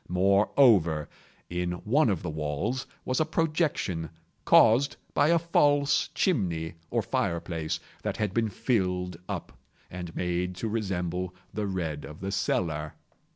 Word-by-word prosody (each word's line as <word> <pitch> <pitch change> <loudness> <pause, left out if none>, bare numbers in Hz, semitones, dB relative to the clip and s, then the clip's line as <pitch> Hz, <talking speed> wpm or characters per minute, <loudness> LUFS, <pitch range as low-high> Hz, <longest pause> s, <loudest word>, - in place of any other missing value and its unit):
Moreover, 95 - +4 0.4
in 90 0 -2
one 120 - +2
of 95 -6 -1
the - - -3
walls 75 - -2 0.2
was 130 - 0
a - - +4
projection, 155 - 0 0.4
caused 130 +6 +5 0.2
by 145 - +4
a 170 +1 +5
false 145 -4 +3
chimney, 85 - 0 0.2
or - - 0
fireplace, 85 -2 -2 0.2
that - - -3
had 105 -3 -1
been 115 -1 +1
filled 90 -5 -1
up, 65 0 -6 0.3
and 90 -2 -7
made 90 +1 -1
to 105 +5 -3
resemble 90 -4 -2 0.2
the 105 -1 -2
red 80 -6 -3
of 75 - -9
the 95 +1 -4
cellar. 80 -6 -1
90 Hz, 135 wpm, -28 LUFS, 85-120 Hz, 0.4 s, caused